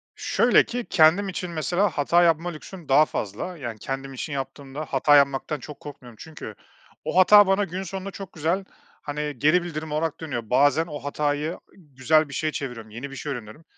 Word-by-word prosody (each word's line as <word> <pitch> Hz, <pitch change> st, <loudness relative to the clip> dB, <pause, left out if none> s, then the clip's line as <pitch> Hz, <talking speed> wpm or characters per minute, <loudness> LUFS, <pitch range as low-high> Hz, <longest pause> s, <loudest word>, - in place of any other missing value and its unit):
Şöyle -, -, +3 dB
ki, 245 Hz, 0 st, -4 dB
kendim 170 Hz, +5 st, +4 dB
için, 180 Hz, -1 st, -5 dB
mesela, 175 Hz, +5 st, 0 dB
hata 170 Hz, +4 st, +2 dB
yapma 165 Hz, +1 st, +2 dB
lüksüm 170 Hz, 0 st, -10 dB
daha 150 Hz, +3 st, +6 dB
fazla. 110 Hz, -, -5 dB
Yani, 120 Hz, -6 st, -6 dB
kendim 135 Hz, +3 st, -5 dB
için 140 Hz, +3 st, -5 dB
yaptığımda 135 Hz, +2 st, -6 dB
hata 145 Hz, +1 st, +3 dB
yapmaktan 140 Hz, +1 st, +2 dB
çok 145 Hz, +4 st, -10 dB
korkmuyorum 125 Hz, -5 st, -11 dB
çünkü 160 Hz, -1 st, -9 dB, 0.5 s
o -, -, -2 dB
hata 205 Hz, +2 st, +8 dB
bana 195 Hz, +2 st, +2 dB
gün 185 Hz, +1 st, -4 dB
sonunda 195 Hz, +2 st, -6 dB
çok 195 Hz, -2 st, -9 dB
güzel, 170 Hz, +5 st, -1 dB, 0.4 s
hani, 150 Hz, 0 st, -4 dB
geri 155 Hz, +7 st, +3 dB
bildirim 160 Hz, -2 st, -6 dB
olarak 155 Hz, +1 st, -2 dB
dönüyor. 120 Hz, -9 st, -5 dB
Bazen 145 Hz, +5 st, +3 dB
o 145 Hz, -2 st, -6 dB
hatayı 145 Hz, +3 st, -2 dB, 0.2 s
güzel 155 Hz, -1 st, +1 dB
bir 140 Hz, -, -9 dB
şeye 155 Hz, +2 st, -1 dB
çeviriyorum, 120 Hz, -7 st, -6 dB
yeni 130 Hz, +6 st, -7 dB
bir -, -, -8 dB
şey 145 Hz, +1 st, -5 dB
öğreniyorum 120 Hz, +4 st, -8 dB
150 Hz, 185 wpm, -24 LUFS, 135-175 Hz, 0.5 s, hata